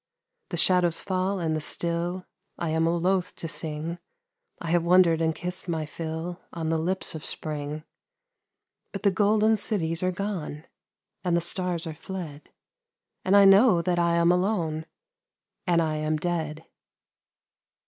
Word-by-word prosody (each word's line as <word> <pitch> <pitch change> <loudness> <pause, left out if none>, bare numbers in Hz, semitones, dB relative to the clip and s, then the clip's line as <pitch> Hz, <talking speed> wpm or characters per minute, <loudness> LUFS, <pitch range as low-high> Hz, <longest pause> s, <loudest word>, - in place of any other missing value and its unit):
The 175 - -3
shadows 175 -1 +3
fall 190 +1 -1
and 160 -2 0
the 155 - -2
still, 170 +3 -2 0.3
I 170 - -2
am 160 +1 +2
loath 180 +2 +1
to 165 - -5
sing, 160 +1 -4 0.6
I 165 - -4
have 175 0 +4
wondered 170 -2 +5
and 160 -1 +1
kissed 180 +3 -5
my 160 -2 -1
fill 160 +3 -5
On 160 -2 -3
the 165 0 +1
lips 185 +4 -2
of 160 -1 -7
spring. 150 0 -4 1.1
But 195 - -5
the 200 - +5
golden 215 +3 +3
cities 170 -5 -1
are 185 - +2
gone 180 -6 -4 0.6
And 175 -2 +2
the - - +3
stars 175 0 -2
are 160 - -4
fled, 160 -2 -8 0.7
And 195 +2 +5
I 200 - +8
know 195 -2 +6
that 175 -1 +1
I 170 0 +3
am 170 0 +4
alone, 175 -4 0 0.8
And 170 -1 +4
1 160 -1 0
am 155 0 0
dead. 160 -1 -3
170 Hz, 150 wpm, -26 LUFS, 160-185 Hz, 1.1 s, I